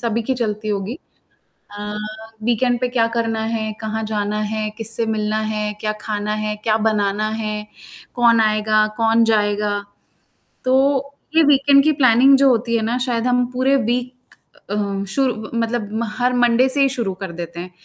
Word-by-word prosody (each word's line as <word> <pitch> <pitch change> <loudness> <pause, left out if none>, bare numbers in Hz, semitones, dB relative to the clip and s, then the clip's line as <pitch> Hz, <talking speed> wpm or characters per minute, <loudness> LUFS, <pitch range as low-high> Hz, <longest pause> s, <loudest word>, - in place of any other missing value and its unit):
सभी 230 0 -1
की 260 +4 -1
चलती 215 -3 -3
होगी। 205 - -3 0.7
अ, 210 0 -6 0.5
वीकेंड 240 +1 +1
पे 250 - 0
क्या 240 -2 +1
करना 225 -1 -1
है? 220 -1 -2
कहाँ 220 0 -3
जाना 210 -1 -2
है, 215 -1 -2
किससे 225 +1 +1
मिलना 215 -1 -1
है, 210 0 -2
क्या 215 -1 -1
खाना 210 0 -3
है, 215 0 -3
क्या 215 -1 +2
बनाना 210 0 0
है, 210 0 -4 0.5
कौन 235 -2 +4
आएगा, 215 0 +2
कौन 225 0 +3
जाएगा? 210 -2 +1 0.9
तो 255 0 +2 0.6
ये 325 - +7
वीकेंड 280 0 +5
की 310 - +4
प्लानिंग 260 +1 +6
जो 275 0 +5
होती 235 -1 +1
है 225 - 0
ना 230 +2 -1
शायद 245 -1 -1
हम 250 0 +2
पूरे 260 +2 +2
वीक 245 +1 -1 0.6
अ, - - -1 0.3
शुरू 235 -1 -1
मतलब 225 -2 -2 0.2
हर 250 0 +2
मंडे 245 +1 +3
से 280 +2 +1
ही 275 - +4
शुरू 235 -7 -2
कर 190 -3 -5
देते 170 0 -6
हैं, 180 +1 -8
225 Hz, 170 wpm, -20 LUFS, 215-245 Hz, 0.9 s, ये